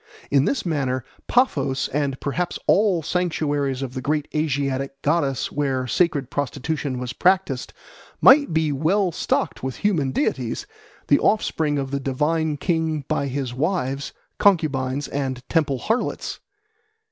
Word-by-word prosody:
In 140 Hz, 0 st, +4 dB
this 275 Hz, -7 st, 0 dB
manner 130 Hz, -6 st, -1 dB, 0.2 s
Paphos, 145 Hz, -, +2 dB
and 140 Hz, -1 st, -1 dB
perhaps 175 Hz, +5 st, -2 dB
all 195 Hz, -5 st, +3 dB
sanctuaries 145 Hz, -6 st, -1 dB
of 130 Hz, -2 st, -5 dB
the 130 Hz, -, -4 dB
great 150 Hz, +2 st, -1 dB
Asiatic 140 Hz, -3 st, -1 dB
goddess 145 Hz, -3 st, +1 dB
where 135 Hz, -3 st, -1 dB
sacred 140 Hz, 0 st, +1 dB
prostitution 145 Hz, 0 st, -2 dB
was 125 Hz, 0 st, -4 dB
practised, 180 Hz, -8 st, +1 dB, 0.5 s
might 285 Hz, -, +7 dB
be 160 Hz, -1 st, +1 dB
well 175 Hz, +7 st, +1 dB
stocked -, -, -1 dB
with 130 Hz, -1 st, -3 dB
human 165 Hz, -10 st, +2 dB
deities, 130 Hz, -4 st, -1 dB, 0.4 s
the 145 Hz, -, +5 dB
offspring 160 Hz, -8 st, +1 dB
of 135 Hz, -1 st, -3 dB
the 140 Hz, -, -1 dB
divine 150 Hz, +3 st, 0 dB
king 160 Hz, -2 st, -1 dB
by 140 Hz, -, 0 dB
his 135 Hz, -2 st, -3 dB
wives, 140 Hz, -2 st, -1 dB, 0.3 s
concubines, 145 Hz, -8 st, +2 dB
and 130 Hz, -2 st, -3 dB
temple 150 Hz, -5 st, +1 dB
harlots. 225 Hz, -, -2 dB
145 Hz, 135 wpm, -23 LUFS, 135-160 Hz, 0.5 s, might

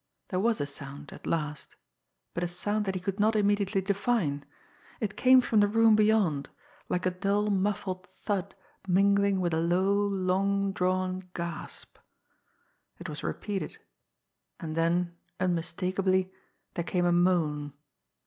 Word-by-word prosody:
There 185 Hz, -, -1 dB
was 225 Hz, +2 st, +2 dB
a 145 Hz, -, 0 dB
sound 140 Hz, 0 st, -9 dB
at -, -, -10 dB
last; 150 Hz, -3 st, -3 dB, 0.6 s
but 170 Hz, -, -2 dB
a -, -, +1 dB
sound 205 Hz, +4 st, -2 dB
that 190 Hz, -1 st, -2 dB
he -, -, -1 dB
could 195 Hz, +2 st, -3 dB
not 215 Hz, +2 st, +3 dB
immediately 205 Hz, -1 st, +2 dB
define. 195 Hz, -7 st, 0 dB, 0.6 s
It 215 Hz, -4 st, -3 dB
came 255 Hz, 0 st, +6 dB
from 225 Hz, -3 st, +2 dB
the 205 Hz, -, +5 dB
room 225 Hz, +1 st, +5 dB
beyond 210 Hz, -9 st, +2 dB, 0.4 s
like 180 Hz, 0 st, -1 dB
a 185 Hz, -, +2 dB
dull, 200 Hz, +3 st, 0 dB
muffled 190 Hz, -2 st, -1 dB
thud 200 Hz, -2 st, -3 dB, 0.3 s
mingling 200 Hz, +1 st, +3 dB
with 175 Hz, -2 st, 0 dB
a 160 Hz, -, +2 dB
low, 180 Hz, +4 st, +2 dB
long 200 Hz, 0 st, +1 dB
drawn 185 Hz, 0 st, -1 dB
gasp. 170 Hz, -1 st, -6 dB, 1.0 s
It -, -, -7 dB
was -, -, -6 dB
repeated 200 Hz, -3 st, -4 dB, 0.8 s
and 160 Hz, -2 st, -5 dB
then, 170 Hz, +1 st, +1 dB, 0.2 s
unmistakably, 185 Hz, +2 st, 0 dB, 0.4 s
there 170 Hz, -, -2 dB
came 175 Hz, +1 st, 0 dB
a 175 Hz, -, +3 dB
moan. 165 Hz, -5 st, +2 dB
185 Hz, 140 wpm, -29 LUFS, 175-200 Hz, 1.0 s, came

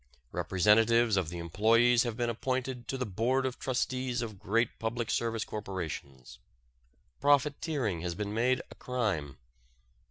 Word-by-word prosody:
Representatives 110 Hz, +4 st, +3 dB
of 95 Hz, -5 st, 0 dB
the 85 Hz, -, -6 dB
employees 115 Hz, +8 st, +3 dB
have 120 Hz, -3 st, -2 dB
been 120 Hz, -1 st, 0 dB
appointed 130 Hz, +1 st, -3 dB
to 135 Hz, -, -2 dB
the 130 Hz, -, -2 dB
Board 120 Hz, +7 st, 0 dB
of 130 Hz, -1 st, -3 dB
Trustees 125 Hz, -1 st, -1 dB
of 110 Hz, -4 st, -7 dB
great 115 Hz, +4 st, 0 dB
public 115 Hz, +1 st, -2 dB
service 115 Hz, -2 st, -1 dB
corporations. 85 Hz, -, -6 dB, 0.8 s
Profiteering 140 Hz, -, +1 dB
has 85 Hz, -1 st, -3 dB
been 105 Hz, +2 st, -3 dB
made 125 Hz, +3 st, +1 dB
a -, -, -8 dB
crime. 100 Hz, -, -2 dB
115 Hz, 135 wpm, -30 LUFS, 100-125 Hz, 0.8 s, Representatives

